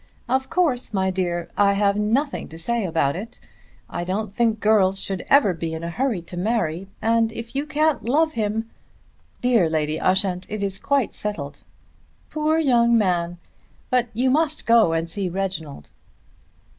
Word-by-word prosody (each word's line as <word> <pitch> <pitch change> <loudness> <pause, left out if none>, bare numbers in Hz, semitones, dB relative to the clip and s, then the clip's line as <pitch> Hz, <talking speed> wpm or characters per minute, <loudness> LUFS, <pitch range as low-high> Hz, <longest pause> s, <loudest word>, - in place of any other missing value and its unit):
Of 265 +2 0
course, 280 - 0
my 190 0 +1
dear, 175 -2 -2
I 200 -1 +4
have 200 0 +2
nothing 230 +8 0
to 160 - -11
say 230 +6 -1
about 160 -5 +1
it. 215 +6 -8 0.5
I - - -4
don't 195 +3 -3
think 225 -1 +1
girls 195 -3 +3
should 190 -1 -4
ever 270 -9 +5
be 165 -1 -4
in 160 - -6
a 170 - -3
hurry 235 -4 -1
to 175 - -9
marry, 190 -3 -1 0.2
and 225 0 +2
if 230 +2 -8
you 285 +2 -1
can't 310 -4 +1
love 310 +7 +2
him 220 0 -1 0.4
" - - -36
"Dear 235 -9 +3
Lady 155 -1 -1
Ushant, 185 -1 +1
it 210 -1 -3
is 195 -1 -2
quite 280 -5 0
settled." 145 -9 -5 0.7
"Poor 310 +1 +1
young 235 -6 +4
man! 175 -4 0 0.5
But 250 -1 +2
you 255 +3 +2
must 310 +2 +1
go 230 -7 +5
and 165 0 -1
see 190 +2 -2
Reginald." 170 - -4
210 Hz, 170 wpm, -23 LUFS, 180-240 Hz, 0.7 s, ever